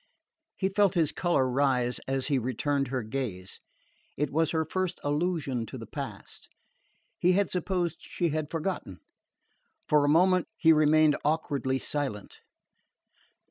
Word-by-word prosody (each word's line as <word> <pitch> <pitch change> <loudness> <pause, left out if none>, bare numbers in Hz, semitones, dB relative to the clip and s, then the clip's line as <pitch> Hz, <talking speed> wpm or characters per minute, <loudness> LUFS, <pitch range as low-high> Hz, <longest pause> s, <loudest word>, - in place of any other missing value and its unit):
He 190 - 0
felt 195 -1 +2
his 160 -4 +2
colour 170 -7 +1
rise 125 -2 +1
as 135 -1 0
he 140 -2 +1
returned 135 +3 -1
her 130 -2 -2
gaze. 110 -6 -4 0.6
It 145 0 -1
was 160 +1 +2
her 160 -1 0
first 185 +2 -2
allusion 145 -6 -1
to - - -7
the - - -8
past. - - -8 0.7
He 180 +1 +4
had 200 +2 +1
supposed 180 -2 -1
she 170 - -2
had 155 -1 -2
forgotten. 165 - -4 0.9
For 150 -1 +4
a 145 - +2
moment 180 +3 +4
he 160 -3 +6
remained 155 0 +4
awkwardly 145 -3 0
silent. 135 -8 -4
150 Hz, 140 wpm, -28 LUFS, 135-170 Hz, 0.9 s, he